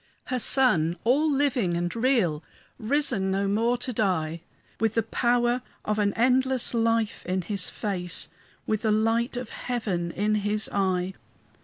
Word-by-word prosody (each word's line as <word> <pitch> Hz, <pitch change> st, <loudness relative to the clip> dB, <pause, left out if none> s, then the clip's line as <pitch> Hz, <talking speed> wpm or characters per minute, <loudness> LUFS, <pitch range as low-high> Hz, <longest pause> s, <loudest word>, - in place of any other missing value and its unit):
Her 255 Hz, -, -2 dB
Son, 180 Hz, -, +3 dB
all 290 Hz, +6 st, +3 dB
living 255 Hz, -11 st, +1 dB
and 175 Hz, +3 st, -2 dB
real, 225 Hz, -, +1 dB, 0.4 s
Risen 225 Hz, -5 st, 0 dB
no 195 Hz, +1 st, 0 dB
more 230 Hz, +5 st, +1 dB
to 250 Hz, +1 st, -4 dB
die, 170 Hz, -7 st, -1 dB, 0.4 s
With 225 Hz, -1 st, 0 dB
the 225 Hz, -, +2 dB
power 240 Hz, +2 st, +1 dB, 0.2 s
of 215 Hz, 0 st, 0 dB
an 205 Hz, -1 st, +2 dB
endless 255 Hz, +2 st, +2 dB
life 230 Hz, -1 st, 0 dB
in 185 Hz, 0 st, -1 dB
his 200 Hz, -2 st, -1 dB
face, 180 Hz, -4 st, -2 dB, 0.4 s
With 215 Hz, -1 st, -1 dB
the 220 Hz, -, 0 dB
light 225 Hz, +3 st, +1 dB
of 245 Hz, -2 st, -5 dB
heaven 205 Hz, -9 st, -3 dB
in 205 Hz, +5 st, 0 dB
his 210 Hz, +1 st, +1 dB
eye. 190 Hz, -2 st, 0 dB
220 Hz, 150 wpm, -26 LUFS, 190-245 Hz, 0.4 s, Son